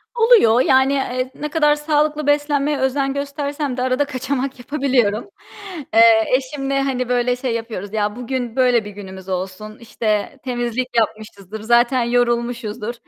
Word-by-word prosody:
Oluyor, 450 - +5
yani, 265 +1 +3
eee, 255 -1 -2
ne 300 +1 -5
kadar 300 -2 +3
sağlıklı 300 0 0
beslenmeye 290 0 +1
özen 270 +1 0
göstersem 280 -1 -3
de 250 - -2
arada 255 +2 +1
kaçamak 270 -1 -3
yapabiliyorum. 245 -5 0 0.6
Eee, 225 0 +6
eşimle, 275 +1 -3
hani, 255 -2 -2
böyle 245 0 +1
şey 250 -2 -3
yapıyoruz, 220 -3 -5
ya 210 -1 -1
bugün 245 -1 -4
böyle 250 -4 +3
bir 210 - -7
günümüz 190 -2 -10
olsun, 190 +4 -5
işte 215 -2 -2
temizlik 245 0 -2
yapmışızdır, 215 -2 -3
zaten 240 +3 +3
yorulmuşuzdur, 235 -2 -1
250 Hz, 140 wpm, -20 LUFS, 225-275 Hz, 0.6 s, Eee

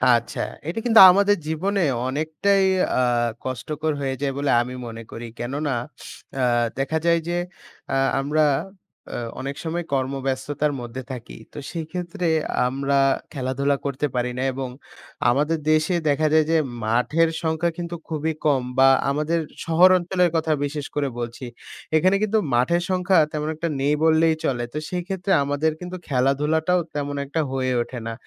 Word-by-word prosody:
আচ্ছা। 120 0 -3 0.3
এটা 170 +7 -2
কিন্তু 230 -2 +6
আমাদের 200 +2 +4
জীবনে 190 +6 0 0.3
অনেকটাই 160 +8 +1 0.4
আ - - +4 0.4
কষ্টকর 150 +5 -3
হয়ে 135 -1 -1
যায় 140 -1 0
বলে 140 0 0
আমি 125 +1 -5
মনে 115 0 -8
করি। 115 +1 -7
কেননা 140 +4 -2 0.7
আ - - +2 0.4
দেখা 140 +4 0
যায় 170 0 +4
যে 175 - -1 0.5
এ্যা - - 0 0.2
আমরা 150 +3 +1 0.7
অ - - -2 0.2
অনেক 140 +1 -4
সময় 170 +1 -3
কর্মব্যস্ততার 135 +2 -1
মধ্যে 120 +2 -6
থাকি 125 -3 -8 0.2
তো - - -11
সেক্ষেত্রে 175 +1 -4 0.4
আমরা 140 +2 0 0.4
খেলাধুলা 140 +1 0
করতে 140 +1 -1
পারি 125 0 0
না 130 - -1
এবং 130 0 -4 0.6
আমাদের 150 +6 +1
দেশে 155 +3 +2
দেখা 155 +2 +2
যায় 155 -1 +5
যে, 165 - +4 0.3
মাঠের 125 +9 +2
সংখ্যা 160 +1 0
কিন্তু 175 0 -4
খুবই 160 0 -1
কম 140 -4 +3 0.2
বা 135 0 +7 0.2
আমাদের 150 +4 0 0.3
শহর 170 +3 +6
অঞ্চলের 180 0 +1
কথা 160 -1 +1
বিশেষ 145 0 -4
করে 145 -1 0
বলছি। 120 +2 -5 0.5
এখানে 185 +5 +3
কিন্তু 215 +1 +2
মাঠের 130 +9 +2
সংখ্যা 185 0 +2
তেমন 150 0 -3
একটা 170 +2 -3
নেই 145 +2 +2
বললেই 160 0 +4
চলে। 120 -3 0
তো - - -4
সেক্ষেত্রে 180 +1 -3
আমাদের 145 +3 0
কিন্তু 180 +1 -6
খেলাধুলাটাও 150 +6 +1 0.2
তেমন 145 -1 -2
একটা 150 +4 -1
হয়ে 130 -1 0
ওঠে 125 +1 -5
না। 115 - -3
150 Hz, 155 wpm, -23 LUFS, 135-170 Hz, 0.7 s, বা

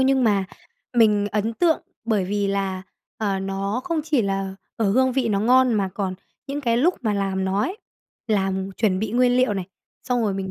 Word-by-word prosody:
nhưng 265 -1 +3
mà 200 -3 +3 0.5
mình 210 -3 +4
ấn 215 +2 0
tượng 330 +4 +2 0.2
bởi 215 -5 +1
vì 200 +1 -1
là, 195 -1 -1 0.3
ờ, 200 -3 -1
nó 195 +4 -2
không 335 -3 0
chỉ 295 -7 +2
là 195 -1 -2 0.2
ở 215 -4 +1
hương 260 +1 +3
vị 255 -3 0
nó 200 -1 +1
ngon, 250 +1 +4
mà 195 -2 +1
còn 190 -3 -2 0.3
những 285 +1 -3
cái 235 -3 +1
lúc 340 +9 +3
mà 215 -2 +1
làm 195 -1 -1
nó 195 +2 0
ấy, 390 +5 -3 0.5
làm 195 -2 0
chuẩn 190 -3 +1
bị 215 0 -2
nguyên 250 0 +3
liệu 255 -5 +3
này, 190 -2 -3 0.4
xong 245 -2 0
rồi 205 -3 0
mình 190 -1 -4
210 Hz, 205 wpm, -23 LUFS, 195-250 Hz, 0.5 s, mình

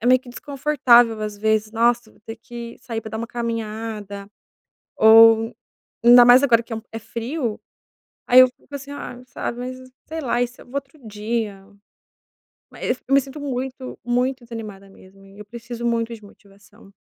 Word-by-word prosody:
é 235 - -3
meio 255 0 +5
que 255 - -17
desconfortável, 245 -4 +2
às 210 -1 -4
vezes: 220 0 0
"Nossa, 235 +1 +1
eu - - -22
vou - - -26
ter 225 +1 -8
que 235 0 -9
sair 230 -2 -5
pra 220 -1 -9
dar 220 - -5
uma 230 - -4
caminhada 220 -3 -5 0.7
ou", 225 +1 +6 0.5
ainda 240 0 +9
mais 245 +2 +7
agora 235 -4 +4
que 230 - -12
é - - -2
um 220 - -7
é 225 - -5
frio. 235 +1 -4 0.7
Aí 250 +1 +7
eu 255 - +9
fico 255 +3 -20
assim: 280 0 -8
"Ah, 250 -3 -8
sabe, 240 -1 -5
mas, 255 +1 -5 0.3
sei 320 0 -5
lá, 245 -3 0
e 245 - +1
se 245 - -18
eu - - -15
vou 250 - -14
outro 280 +2 -5
dia". 210 -2 -4 1.1
Mas 250 - -3
eu 275 - -2
me 275 - +6
sinto 275 +3 -10
muito, 260 -1 -5
muito 250 +1 -1
desanimada 215 -4 -9
mesmo 195 0 -19
e 195 +1 -17
eu 210 - -9
preciso 235 +2 -8
muito 230 0 -1
de 220 - -14
motivação. 200 +1 -20
235 Hz, 190 wpm, -22 LUFS, 220-250 Hz, 1.1 s, ainda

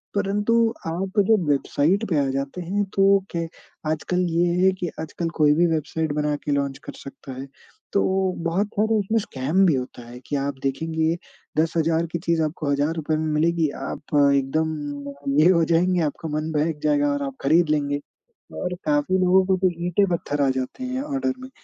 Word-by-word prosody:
परंतु 205 +3 +1 0.3
आप 190 +5 -2
जब 215 -6 +4
वेबसाइट 155 +8 +1
पे 160 - +1
आ - - -1
जाते 140 +6 -3
हैं, 195 +4 -1
तो 195 0 +5
क्या 170 - -2
है 165 - -4 0.4
आजकल 160 +3 -1
ये 170 +1 +2 0.2
है 190 - +6
कि 175 - -2
आजकल 165 +1 -3
कोई 150 -1 +6
भी 175 +2 +4
वेबसाइट 155 0 -2
बना 150 0 0
के - - -1
लॉन्च 140 -1 0
कर - - -7
सकता 135 0 -10
है। 135 - -8 0.5
तो 200 - +3 0.4
बहुत 180 +5 +1
सारे 220 +2 +2
उसमें 210 +3 0
स्कैम 160 +1 +1
भी 165 -6 +4
होता 125 -1 -5
है, 120 +1 -10
कि 145 - -2
आप 140 0 -2
देखेंगे 160 +4 0 0.4
10,000 165 0 +1
की 170 - -2
चीज़ 165 -1 0
आपको 155 -1 -2
हज़ार 145 +3 +1
रुपए 155 -1 -1
में 155 0 -1
मिलेगी। 165 +1 +2
आप - - -5 0.3
एकदम 155 +4 0 0.4
अ, - - -10 0.3
ये 165 +4 +6
हो 170 -2 +3
जाएँगे, 175 +2 +2
आपका 160 +1 -3
मन 155 +1 -2
बहक 150 0 0
जाएगा 145 -1 +2
और 145 0 -2
आप 135 -1 -4
खरीद 160 +4 +3
लेंगे। 145 -1 0 0.6
और 180 0 -2
काफ़ी 290 -10 +2
लोगों 185 +1 +4
को 190 0 +2
तो 185 0 +3 0.2
ईंटें 180 +3 +3
पत्थर 145 -4 -1
आ 140 - +3
जाते 130 - -4
हैं, 255 +1 -2
ऑर्डर 275 -2 -1
में, 260 0 -9
165 Hz, 195 wpm, -23 LUFS, 145-185 Hz, 0.6 s, है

